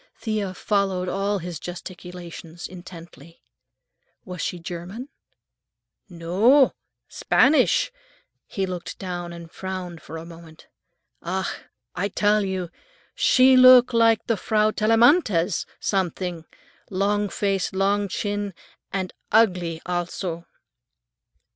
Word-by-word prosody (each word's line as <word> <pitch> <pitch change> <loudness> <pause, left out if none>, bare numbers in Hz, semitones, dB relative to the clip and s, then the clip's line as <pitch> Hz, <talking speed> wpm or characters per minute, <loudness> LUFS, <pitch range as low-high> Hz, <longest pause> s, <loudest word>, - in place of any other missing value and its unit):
Thea 210 -4 -3
followed 195 -3 0
all 200 +2 -1
his 175 -3 -6
gesticulations 175 -1 -8
intently. 170 -3 -13 0.8
"Was 180 -2 -6
she 180 - -2
German?" 175 - -7 1.0
"No, 195 +11 +3 0.3
Spanisch." 310 - +3 0.6
He 195 - -2
looked 180 -2 -6
down 175 -2 -5
and 170 -1 -10
frowned 185 -3 -6
for 165 - -8
a 160 - -8
moment. 165 -1 -14 0.6
"Ach, 185 +1 -4 0.3
I 190 +3 -1
tell 210 +2 +2
you, 185 -3 -3 0.4
she 260 +1 +5
look 255 -1 +8
like 230 -1 +3
the 230 - 0
Frau 215 +2 +1
Tellamantez, 220 - +3
some 190 -3 0
thing. 175 -1 -6 0.4
Long 205 +2 0
face, 195 -3 -1
long 200 +1 +1
chin, 205 0 -3 0.4
and 190 -2 -3 0.2
ugly 180 -7 +2
al 175 -1 -1
so." 170 -2 -5
190 Hz, 110 wpm, -24 LUFS, 175-210 Hz, 1.0 s, look